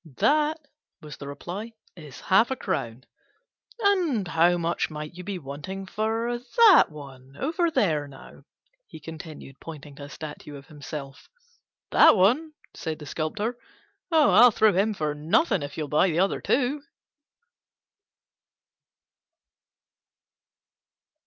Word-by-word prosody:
"That," 305 +2 +2 0.4
was 150 -2 -10
the 140 - -9
reply, 185 +10 -7 0.2
"is 150 -6 -12
half 195 +5 +3
a 265 - -1
crown." 115 - -4 0.8
"And 350 - +1
how 175 +1 +3
much 170 0 -1
might 150 0 -7
you 180 +1 -9
be 195 0 -4
wanting 150 +6 -7
for 225 +4 -2
that 400 - +6
one 135 -3 -13
over 335 +4 0
there, 165 - 0
now?" 135 -1 -14 0.4
he - - -11
continued, 155 -3 -10
pointing 150 -3 -10
to 140 - -8
a - - -12
statue 150 -1 -9
of 140 0 -11
himself. 145 -1 -9 0.6
"That - - +7
one?" 260 - +2 0.2
said 160 -2 -5
the 150 - -10
Sculptor; 205 - -3 0.5
"Oh, 310 -9 +5
I'll 230 +7 +8
throw 220 -1 +3
him 190 - -1
in 215 +2 +1
for 155 -4 -2
nothing 170 - +1
if 145 0 -7
you'll 155 -2 -3
buy 150 +6 +3
the 160 - -2
other 190 +3 +1
two." 275 +3 0
175 Hz, 135 wpm, -25 LUFS, 150-230 Hz, 0.8 s, I'll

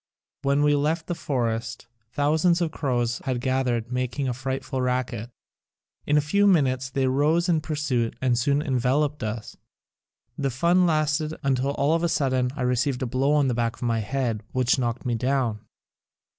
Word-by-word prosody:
When 140 +1 +2
we 145 0 +4
left 155 +3 0
the 175 - -2
forest, 115 -7 -2 0.3
thousands 155 +6 +2
of 170 -3 -1
crows 125 -5 -1
had 130 -2 -1
gathered 125 -2 -1
making 125 +2 -2
a 125 - 0
frightful 130 +1 -3
racket. 125 -3 -2 0.8
In 150 - +3
a - - +5
few 200 +7 +3
minutes 130 -8 +2
they 135 +1 0
rose 150 +7 +2
in 165 -3 +2
pursuit 145 -7 -1
and 130 -2 +2
soon 140 +5 +1
enveloped 140 +2 0
us. 110 0 -5 0.8
The 140 -1 0
fun 170 +8 +3
lasted 155 0 0
until 135 0 +1
all 145 +2 +1
of 165 - +1
a 170 - +1
sudden 130 -5 +1
I 135 - -3
received 125 +1 0
a - - 0
blow 130 +4 +1
on 145 -2 +3
the 125 - +1
back 115 -1 -1
of - - -9
my 115 -1 +1
head 115 -1 -2
which 130 +1 +2
knocked 120 +1 -2
me 120 - 0
down. 125 -2 0
130 Hz, 175 wpm, -25 LUFS, 125-150 Hz, 0.8 s, a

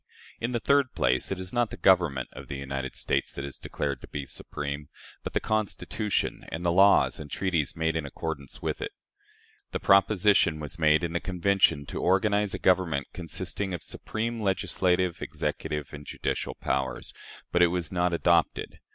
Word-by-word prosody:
In 115 - -1
the 120 - 0
third 140 +1 +2
place, 65 +7 +1
it 95 - -2
is 95 0 -5
not 120 -2 +2
the - - -8
Government 85 -8 +3
of - - -10
the 70 - -5
United 70 -1 -4
States - - -1
that 70 - -5
is 70 - -7
declared - - -3
to - - -10
be 70 -1 -5
supreme, 70 +1 -5 0.3
but - - -6
the - - +2
Constitution 110 0 -1
and 85 +2 -4
the 85 - +3
laws 100 +3 +5
and 75 -1 -7
treaties 85 -4 0
made 80 0 0
in 80 - 0
accordance 70 -1 -5
with - - -2
it. - - -4 0.8
The - - -1
proposition 100 -4 +4
was 75 +2 -5
made 75 +1 +4
in 85 -1 -2
the 85 - +1
Convention 95 -5 +2
to - - -5
organize 100 +2 +2
a - - -2
government 90 -6 +2
consisting 90 +2 -3
of 85 - -8
"supreme 115 +1 -3
legislative, 90 -2 +1
executive, 75 -3 -3
and 75 0 -7
judicial - - -3
powers," 65 0 -2 0.4
but 90 - +3
it 90 - +8
was 85 -2 -2
not 90 -1 +1
adopted. 85 0 +1
85 Hz, 175 wpm, -28 LUFS, 75-95 Hz, 0.8 s, it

